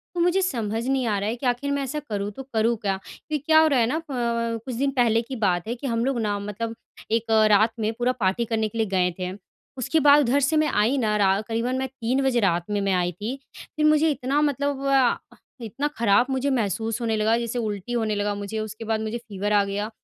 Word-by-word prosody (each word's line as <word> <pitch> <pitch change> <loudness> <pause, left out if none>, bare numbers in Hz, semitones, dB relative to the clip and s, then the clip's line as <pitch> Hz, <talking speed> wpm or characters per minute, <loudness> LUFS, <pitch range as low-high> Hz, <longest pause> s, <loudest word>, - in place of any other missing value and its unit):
तो - - -2
मुझे 355 +2 +3
समझ 230 - -2
नहीं 265 -1 +1
आ 210 - +1
रहा 200 +2 -1
है, 230 - -2
कि 245 - -7
आख़िर 250 +3 0
मैं 280 0 0
ऐसा 280 +3 -3
करूँ 205 -1 -2
तो 270 +6 -8
करूँ 225 +1 +2
क्या? 195 -2 -1
क्योंकि 305 - -5
क्या 315 0 +6
हो 315 - +5
रहा 280 -4 +3
है 230 - +4
ना? 260 - -1
अ - - -4 0.4
अ, - - -3
कुछ 255 - -4
दिन 275 +3 0
पहले 230 -2 +3
की 250 +3 -7
बात 175 -1 0
है, 235 - -2
कि 270 +3 -6
हम 230 -1 0
लोग 270 -2 0
ना 205 -1 -1
मतलब 210 +3 -5 0.4
एक 225 0 0
अ, 220 -1 +5
रात 215 +2 +4
में 220 0 0
पूरा 245 +2 0
पार्टी 195 +3 +1
करने 220 -1 0
के 225 - -8
लिए 220 -1 +1
गए 180 -1 +2
थे। 180 0 -3 0.5
उसके 315 +6 +1
बाद 285 +1 +8
उधर 275 +3 +3
से 315 - +2
मैं 305 0 +3
आई 225 +7 +2
ना, 215 -5 +1
रा 195 -1 +3
क़रीबन 230 +2 -1
मैं 265 - -1
3 260 0 -1
बजे 260 -3 +2
रात 175 -5 +1
में 205 -1 0
मैं 195 -1 +1
आई 180 -1 +1
थी। 210 +9 -5 0.2
फिर 305 0 -3
मुझे 305 +1 +4
इतना 280 +1 0
मतलब 285 -1 -1
अ, 270 -3 +1 0.3
इतना 255 +7 -2
ख़राब 225 0 +4
मुझे 265 +1 0
महसूस 225 -1 -1
होने 225 -2 0
लगा, 220 +2 +2
जैसे 235 +1 -3
उल्टी 215 0 -4
होने 220 -3 0
लगा 205 0 -1
मुझे, 205 +2 -4
उसके 215 +1 -6
बाद 220 0 -1
मुझे 220 +2 -3
फ़ीवर 210 -3 -3
आ 205 -1 +4
गया। 205 +2 -3
230 Hz, 250 wpm, -24 LUFS, 210-265 Hz, 0.5 s, बाद